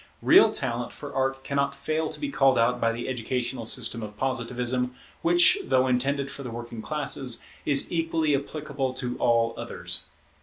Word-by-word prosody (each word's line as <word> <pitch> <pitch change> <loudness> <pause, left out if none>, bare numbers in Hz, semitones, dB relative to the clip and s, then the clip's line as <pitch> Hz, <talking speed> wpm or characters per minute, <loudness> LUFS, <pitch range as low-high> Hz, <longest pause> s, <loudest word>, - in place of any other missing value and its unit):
Real - - +7
talent - - -3
for - - -9
Art 135 0 -1
cannot 140 0 -1
fail 155 +3 -2
to - - -8
be 290 -2 -3
called 135 - +4
out 115 +2 +2
by 115 - +3
the 115 +1 -5
educational 125 -1 -3
system 115 0 0
of 105 -1 -8
Positivism, 125 0 -1 0.3
which, 175 +1 +5
though 130 0 +2
intended 135 +2 0
for - - -8
the 125 - -6
working 120 -1 -7
classes, 135 -3 -1 0.2
is 140 -2 +3
equally 165 -3 +1
applicable 140 -2 -3
to 125 -2 -4
all 115 -1 +2
others. - - -2
130 Hz, 165 wpm, -26 LUFS, 120-140 Hz, 0.3 s, Real